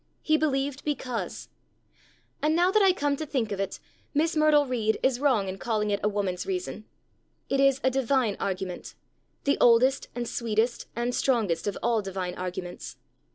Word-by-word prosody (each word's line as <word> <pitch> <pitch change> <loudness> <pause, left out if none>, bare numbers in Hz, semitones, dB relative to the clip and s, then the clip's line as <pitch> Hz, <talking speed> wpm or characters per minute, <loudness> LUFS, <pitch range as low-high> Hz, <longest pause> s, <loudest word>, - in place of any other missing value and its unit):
He 310 - +3
believed 280 -3 0
because. 255 -5 -3 0.9
And, 305 +2 +2
now 355 +2 +3
that 430 +1 +4
I 385 -1 +6
come 290 -5 0
to 315 - -4
think 245 -7 -1
of 200 - -3
it, 195 - -3 0.4
Miss 320 +3 +2
Myrtle 305 -1 +4
Reed 225 -4 0
is 260 -2 +2
wrong 255 -9 +2
in 190 +1 -5
calling 215 -3 -1
it 200 - +1
a 210 - +2
woman's 200 - -2
reason. 365 -2 -4 0.6
It 275 - +1
is 275 -1 +4
a 260 - +3
divine 260 -4 +1
argument, 185 -2 -4 0.5
the 280 - +1
oldest, 250 +3 +4
and 240 -1 -3
sweetest, 230 +1 -1
and 240 +1 -1
strongest 215 -12 +1
of 205 - -2
all 230 -2 +2
divine 190 -2 -4
arguments. 180 0 -6
245 Hz, 170 wpm, -27 LUFS, 205-285 Hz, 0.9 s, I